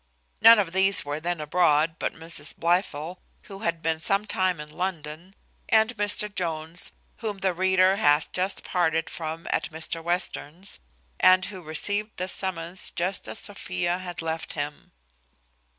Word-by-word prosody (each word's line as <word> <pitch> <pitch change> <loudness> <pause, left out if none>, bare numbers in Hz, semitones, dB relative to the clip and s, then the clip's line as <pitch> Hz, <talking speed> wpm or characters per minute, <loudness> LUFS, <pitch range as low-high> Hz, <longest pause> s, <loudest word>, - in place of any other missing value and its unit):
None 230 0 +10
of 195 -5 0
these 190 0 +5
were 145 +1 -3
then 175 +1 -2
abroad, 155 0 +2
but - - -2
Mrs 165 +1 -2
Blifil, 170 -1 0 0.2
who 195 -2 -10
had 170 -5 -2
been 160 0 0
some 195 +6 +1
time 185 -4 0
in 150 - -7
London, 175 0 -5 0.3
and 220 +2 +4
Mr 205 0 +1
Jones, 165 -2 -3 0.3
whom 215 -4 -4
the 190 -1 0
reader 190 +1 +3
hath 150 -6 +3
just 185 +2 -1
parted 165 -3 0
from 160 0 -5
at - - 0
Mr 165 +1 -4
Western's, 175 +1 -2 0.4
and 185 0 +6
who 190 -3 -8
received 205 +7 -1
this 185 0 -2
summons 180 -1 -1
just 185 +3 -2
as - - -4
Sophia 180 -3 -2
had 175 -2 -5
left 160 0 -3
him. 145 0 -5
175 Hz, 150 wpm, -26 LUFS, 160-190 Hz, 0.4 s, None